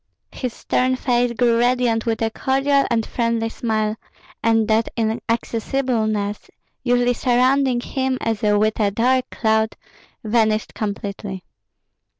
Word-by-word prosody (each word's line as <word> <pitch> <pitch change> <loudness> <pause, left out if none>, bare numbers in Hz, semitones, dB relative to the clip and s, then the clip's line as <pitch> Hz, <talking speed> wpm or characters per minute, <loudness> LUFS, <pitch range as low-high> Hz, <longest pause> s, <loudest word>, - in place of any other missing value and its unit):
His 250 -2 -4
stern 255 +2 0
face 245 -1 +1
grew 235 -1 +2
radiant 240 -2 +1
with 225 0 0
a 225 - 0
cordial 275 +4 +1
and 230 -2 +1
friendly 230 -1 -1
smile, 215 -2 -1 0.5
and 225 -1 +2
that 220 +1 +2
inaccessibleness 225 -1 -1 0.3
usually 245 0 +2
surrounding 255 +1 +2
him 265 0 -1
as 225 -2 -2
with 215 +1 +2
a 205 -2 +3
dark 255 +5 +1
cloud 220 -1 0 0.5
vanished 220 -1 +1
completely. 200 -2 -5
230 Hz, 120 wpm, -21 LUFS, 220-250 Hz, 0.5 s, a